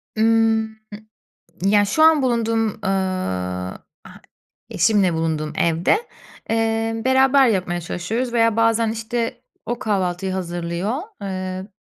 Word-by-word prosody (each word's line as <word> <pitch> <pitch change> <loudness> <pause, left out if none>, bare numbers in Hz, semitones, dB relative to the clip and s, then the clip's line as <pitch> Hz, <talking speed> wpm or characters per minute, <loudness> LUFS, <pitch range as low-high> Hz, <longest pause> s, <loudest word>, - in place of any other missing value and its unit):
Imm, 220 0 +2 0.9
ya 205 +1 +4
şu 260 +10 +1
an 315 -3 +6
bulunduğum, 225 -3 0
ııı, 95 - -2 0.3
h - - -12 0.6
eşimle 190 -2 +2
bulunduğum 160 -1 -2
evde, 170 - +2 0.5
ııı, 225 0 0
beraber 265 +1 +5
yapmaya 180 -4 -1
çalışıyoruz 225 +9 -3
veya 230 -2 +2
bazen 230 0 +2
işte 230 +2 -3 0.2
o 240 +1 -2
kahvaltıyı 190 -2 -1
hazırlıyor, 175 +2 -3 0.3
ııı, 185 0 -4
215 Hz, 105 wpm, -21 LUFS, 180-230 Hz, 0.9 s, an